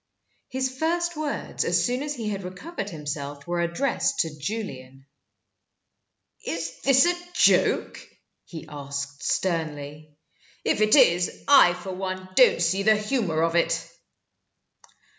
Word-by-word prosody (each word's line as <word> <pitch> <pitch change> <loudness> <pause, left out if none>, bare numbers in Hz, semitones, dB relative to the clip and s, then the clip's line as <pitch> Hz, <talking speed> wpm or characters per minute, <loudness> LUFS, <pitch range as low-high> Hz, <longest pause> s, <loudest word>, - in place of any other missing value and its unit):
His 260 0 -2
first 345 +1 0
words, 300 -2 -3
as - - +1
soon 250 +1 -1
as 295 0 -3
he 225 -4 -4
had 200 -2 -3
recovered 195 - -6
himself, 145 -3 -6
were 175 0 -1
addressed 170 +11 0
to 160 -2 -4
Julian. 135 -7 -6 1.4
"Is 165 0 -5
this 270 +1 +5
a 350 - +3 0.2
joke?" - - +3 0.4
he 160 -3 -10
asked, 140 0 -6
sternly. 150 -3 -3 0.5
"If - - +1
it 215 0 +5
is, 175 -10 +3
I 270 -11 +7
for 180 +2 -7
one 185 0 -5
don't 245 -6 +5
see 185 +4 +1
the 215 +1 +4
humor 210 -8 -1
of 165 0 0
it." 170 - +1
180 Hz, 130 wpm, -25 LUFS, 155-245 Hz, 1.4 s, I